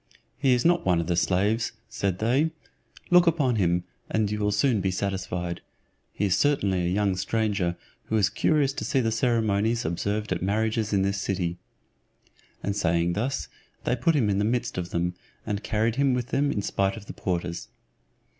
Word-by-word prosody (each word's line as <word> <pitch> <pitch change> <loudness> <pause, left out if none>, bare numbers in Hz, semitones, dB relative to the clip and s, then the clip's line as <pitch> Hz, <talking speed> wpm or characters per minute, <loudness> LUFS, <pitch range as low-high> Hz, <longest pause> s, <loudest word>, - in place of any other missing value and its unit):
"He 135 -3 +3
is 120 - -1
not 175 +1 +4
one 90 -2 +2
of 85 - -1
the 85 0 0
slaves'" 100 +6 +1
said 95 -3 -2
they; 125 +10 +2 0.6
"look 175 0 +6
upon 140 -8 +2
him, 90 -2 +2 0.3
and 110 -2 0
you 105 - -2
will 105 0 +1
soon 105 +1 +2
be 95 - +1
satisfied. 90 -2 -3 0.5
He 105 - -1
is 95 - +3
certainly 100 -11 +2
a 85 - 0
young 100 0 +1
stranger, 95 -3 0 0.3
who 110 - 0
is 100 -2 +4
curious 140 +6 +1
to - - -4
see 135 - +1
the 115 -3 +1
ceremonies 115 -1 +1
observed 100 +6 -2
at 90 - -1
marriages 110 +3 0
in 100 -2 +2
this 100 0 0
city;" 90 -3 -2 1.0
and 100 - -1
saying 85 -2 +1
thus, 125 +9 -2 0.4
they 125 - +1
put 140 +7 +2
him 125 -7 +2
in 100 -1 +1
the - - +2
midst 120 +2 -1
of 90 0 -4
them, 90 +1 -1 0.3
and 105 -2 -2
carried 110 +2 0
him 135 -2 +3
with 125 0 -3
them 140 +1 +1
in 100 - -2
spite 95 +2 0
of 105 - -10
the - - -8
porters. 85 -1 -3
105 Hz, 190 wpm, -26 LUFS, 95-120 Hz, 1.0 s, look